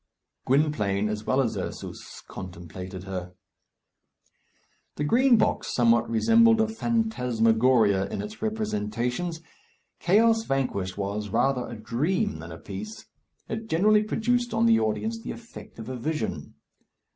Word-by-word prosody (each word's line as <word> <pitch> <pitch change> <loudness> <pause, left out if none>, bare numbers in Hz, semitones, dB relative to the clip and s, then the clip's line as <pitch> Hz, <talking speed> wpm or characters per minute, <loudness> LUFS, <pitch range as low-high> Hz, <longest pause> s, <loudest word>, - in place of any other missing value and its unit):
Gwynplaine, 115 -8 +1
as 105 0 -4
well 130 +1 +3
as 120 -4 -1
Ursus, - - -7
contemplated 90 0 -8
her. 90 -2 -6 1.6
The - - -2
Green 240 - +4
Box 215 - 0
somewhat 120 -1 +3
resembled 225 - +5
a 220 - +3
phantasmagoria 125 - +2
in - - -4
its 210 +1 -9
representations. 165 - -2 0.6
"Chaos 225 +5 +4
Vanquished" 100 -9 -1
was 100 +1 -3
rather 130 +4 +1
a - - -7
dream 155 - -1
than - - -9
a - - -8
piece; 220 0 -8 0.4
it 220 0 -5
generally 210 +6 +4
produced 240 +2 0
on 225 +1 +3
the 230 -1 +5
audience 220 - -1
the - - -8
effect 235 0 -10
of 115 -1 -8
a 130 0 -4
vision. 155 +6 -3
135 Hz, 130 wpm, -26 LUFS, -, 1.6 s, resembled